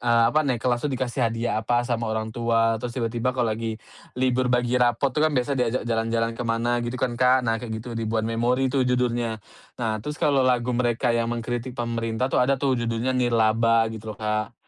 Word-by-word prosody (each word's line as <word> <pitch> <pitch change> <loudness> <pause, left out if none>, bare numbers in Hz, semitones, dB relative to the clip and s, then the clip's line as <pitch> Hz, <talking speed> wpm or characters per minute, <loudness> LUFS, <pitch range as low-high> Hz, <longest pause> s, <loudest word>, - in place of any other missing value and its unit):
eee, 115 -1 +3
apa, 155 - +4
eee, 125 -3 +1
kelas 120 0 +1
itu - - -2
dikasih 130 0 -3
hadiah 115 -1 -1
apa 120 +2 +1
sama 120 -2 -1
orang 110 0 -2
tua, 115 -1 +1
terus 120 -1 -4
tiba-tiba 120 +1 -1
kalo 120 -3 +1
lagi 110 0 -3 0.5
libur 130 0 +2
bagi 125 0 +1
rapot 120 +3 +2
itu 150 - +2
kan 155 - +2
biasa 125 +2 0
diajak 125 0 0
jalan-jalan 115 0 0
ke - - -3
mana 120 +1 +1
gitu 120 +2 -3
kan 120 -2 -1
Kak. 130 0 +4
Nah 115 -1 +1
kayak 115 -1 -6
gitu 125 - -9
"Ribuan 110 -1 -1
Memori" 125 +3 +1
tuh 135 -2 +2
judulnya. 120 -3 0 0.4
Nah 110 -2 -1
terus 150 +7 -5
kalo 140 -2 +3
lagu 125 -1 +2
mereka 120 0 +1
yang 115 0 0
mengkritik 120 +1 -3
pemerintah 115 +1 -2
tuh, - - +3
ada 135 +2 +3
tuh, 135 0 0
judulnya 115 +2 -1
"Nirlaba" 115 -1 +3
gitu 110 0 -7
loh - - -32
Kak. 110 0 -2
120 Hz, 210 wpm, -24 LUFS, 115-125 Hz, 0.5 s, apa